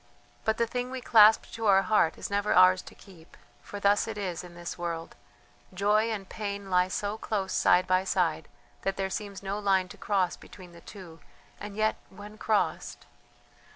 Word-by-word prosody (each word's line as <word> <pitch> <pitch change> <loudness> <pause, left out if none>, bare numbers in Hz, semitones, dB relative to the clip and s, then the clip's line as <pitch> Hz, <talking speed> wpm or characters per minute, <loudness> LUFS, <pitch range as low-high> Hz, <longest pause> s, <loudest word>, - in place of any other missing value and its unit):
"But 220 - +1
the 235 - +2
thing 245 +2 -4
we 260 0 -5
clasp 220 -3 +5
to 225 -1 -3
our 195 -1 +5
heart 200 -7 +2
is - - -7
never 205 +1 +1
ours 185 0 +6
to - - -14
keep, 175 -5 -17 0.2
for 205 - -8
thus 200 +2 +2
it 220 -1 -5
is 185 -5 -4
in 175 -1 -12
this 175 0 -6
world. 170 -1 -5 0.6
Joy 210 +3 +2
and 205 -4 -4
pain 200 -2 -6
lie 180 0 +3
so 205 +3 -3
close 195 -3 -3
side 180 +1 +3
by 185 0 +2
side 170 -5 -1 0.3
that 195 0 -2
there 190 0 -2
seems 200 -2 -6
no 200 +1 -3
line 190 -3 +1
to - - -12
cross 195 -4 0
between 180 -2 -14
the 170 0 -15
two 175 -5 -12 0.4
and 205 0 -8
yet 215 0 0
when 205 +2 -12
crossed.... 215 -2 -1
200 Hz, 190 wpm, -28 LUFS, 185-210 Hz, 0.6 s, ours